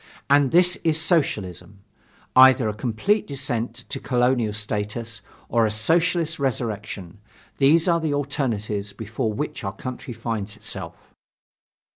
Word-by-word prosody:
And 140 Hz, -1 st, +5 dB
this 180 Hz, +3 st, +5 dB
is 160 Hz, -1 st, +1 dB
Socialism. 105 Hz, -, -1 dB, 0.5 s
Either 130 Hz, -2 st, +7 dB
a 105 Hz, -, -1 dB
complete 125 Hz, -, 0 dB
descent 125 Hz, -4 st, -3 dB
to -, -, -3 dB
colonial 125 Hz, -3 st, +1 dB
status 105 Hz, +1 st, -3 dB, 0.3 s
or 115 Hz, 0 st, +2 dB
a 110 Hz, -, +2 dB
Socialist 165 Hz, +8 st, +1 dB
resurrection 110 Hz, -7 st, -3 dB, 0.4 s
these 160 Hz, +5 st, +5 dB
are 170 Hz, -1 st, +3 dB
the 160 Hz, -2 st, -1 dB
alternatives 110 Hz, -8 st, -2 dB
before 110 Hz, +1 st, -3 dB
which 150 Hz, +4 st, -4 dB
our 95 Hz, -1 st, -3 dB
country 130 Hz, 0 st, -7 dB
finds 110 Hz, -3 st, -4 dB
itself. -, -, -8 dB
120 Hz, 125 wpm, -23 LUFS, 105-145 Hz, 0.5 s, Either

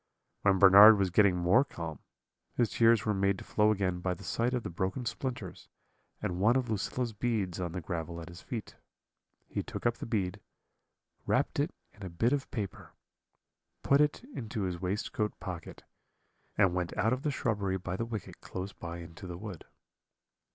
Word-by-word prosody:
"When 100 Hz, -1 st, +4 dB
Bernard 100 Hz, +3 st, +9 dB
was 95 Hz, -2 st, +1 dB
getting 100 Hz, 0 st, +5 dB
more 90 Hz, +9 st, +4 dB
calm, 85 Hz, -, -7 dB, 0.6 s
his 120 Hz, -3 st, +1 dB
tears 115 Hz, -1 st, +4 dB
were 105 Hz, -, +2 dB
made 100 Hz, 0 st, +1 dB
to -, -, -9 dB
flow 105 Hz, 0 st, +2 dB
again 95 Hz, -4 st, 0 dB
by 90 Hz, 0 st, -1 dB
the 100 Hz, -, -13 dB
sight 115 Hz, +6 st, 0 dB
of 120 Hz, -, -2 dB
the -, -, -5 dB
broken 95 Hz, +8 st, -2 dB
splinters 120 Hz, -5 st, -5 dB, 0.5 s
and 90 Hz, 0 st, -2 dB
one 115 Hz, +5 st, +4 dB
of 125 Hz, -3 st, 0 dB
Lucilla's 115 Hz, +3 st, -2 dB
beads 105 Hz, -5 st, -1 dB
on 90 Hz, -2 st, -3 dB
the 90 Hz, -, -3 dB
gravel 85 Hz, +1 st, -4 dB
at 80 Hz, -, -8 dB
his 85 Hz, +1 st, -11 dB
feet. 115 Hz, -4 st, -6 dB, 0.7 s
He -, -, -2 dB
took -, -, -7 dB
up 120 Hz, 0 st, +2 dB
the -, -, -6 dB
bead, 95 Hz, -6 st, -1 dB, 0.9 s
wrapped -, -, +1 dB
it -, -, +2 dB, 0.2 s
in 105 Hz, -, -19 dB
a 95 Hz, -, -5 dB
bit 115 Hz, +10 st, +1 dB
of 140 Hz, -2 st, -2 dB
paper, 105 Hz, -6 st, -5 dB, 0.9 s
put 140 Hz, +1 st, +4 dB
it 150 Hz, +9 st, +1 dB
into 110 Hz, -3 st, -4 dB
his 90 Hz, -2 st, -3 dB
waistcoat 105 Hz, +2 st, -2 dB
pocket, 90 Hz, -3 st, -7 dB, 0.7 s
and 95 Hz, -2 st, +4 dB
went 90 Hz, -1 st, -2 dB
out 110 Hz, +5 st, +2 dB
of 130 Hz, -, -2 dB
the 150 Hz, -, 0 dB
shrubbery 105 Hz, -8 st, -1 dB
by 90 Hz, -1 st, -4 dB
the 105 Hz, -, -2 dB
wicket 110 Hz, -4 st, -7 dB
close 95 Hz, +2 st, -6 dB
by 85 Hz, 0 st, -7 dB
into 85 Hz, +3 st, -9 dB
the 90 Hz, -1 st, -6 dB
wood. 100 Hz, -4 st, -8 dB
100 Hz, 185 wpm, -31 LUFS, 90-115 Hz, 0.9 s, Bernard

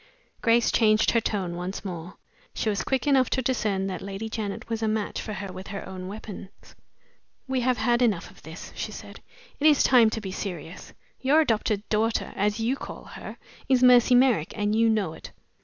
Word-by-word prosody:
Grace 230 Hz, 0 st, +3 dB
changed 215 Hz, -1 st, +4 dB
her 230 Hz, -, +2 dB
tone 190 Hz, -6 st, -2 dB
once 180 Hz, +4 st, -5 dB
more. 175 Hz, -1 st, -7 dB, 0.4 s
She 220 Hz, -, -1 dB
was 200 Hz, -4 st, -1 dB
quick 265 Hz, 0 st, -1 dB
enough 270 Hz, -3 st, +3 dB
to 260 Hz, -, 0 dB
discern 215 Hz, -6 st, 0 dB
that 190 Hz, -1 st, -4 dB
Lady 200 Hz, +3 st, -5 dB
Janet 210 Hz, -2 st, -4 dB
was 225 Hz, -1 st, -3 dB
a 220 Hz, -, +1 dB
match 215 Hz, -1 st, -2 dB
for 215 Hz, -, -5 dB
her 195 Hz, -2 st, -6 dB
with 185 Hz, +1 st, -8 dB
her 200 Hz, -1 st, -6 dB
own 185 Hz, -1 st, -7 dB
weapons. 200 Hz, -1 st, -10 dB, 0.7 s
"We 260 Hz, -1 st, 0 dB
have 250 Hz, 0 st, +1 dB
had 240 Hz, +2 st, +2 dB
enough 215 Hz, -8 st, +1 dB
of -, -, -19 dB
this," 160 Hz, +2 st, -10 dB
she -, -, -4 dB
said. -, -, -10 dB, 0.4 s
"It 300 Hz, -, +4 dB
is 295 Hz, -3 st, +5 dB
time 240 Hz, -4 st, +6 dB
to 220 Hz, -, -3 dB
be 195 Hz, -3 st, -6 dB
serious. 180 Hz, -3 st, -7 dB, 0.3 s
Your 280 Hz, +4 st, +4 dB
adopted 215 Hz, -6 st, 0 dB
daughter 220 Hz, +1 st, 0 dB
(as 210 Hz, +2 st, 0 dB
you 235 Hz, +4 st, +1 dB
call -, -, -8 dB
her) -, -, -8 dB, 0.3 s
is 255 Hz, -1 st, +4 dB
Mercy 250 Hz, 0 st, +6 dB
Merrick, 245 Hz, -, +3 dB
and 210 Hz, 0 st, 0 dB
you 225 Hz, 0 st, +4 dB
know 205 Hz, -7 st, 0 dB
it." -, -, -11 dB
215 Hz, 200 wpm, -26 LUFS, 195-240 Hz, 0.7 s, time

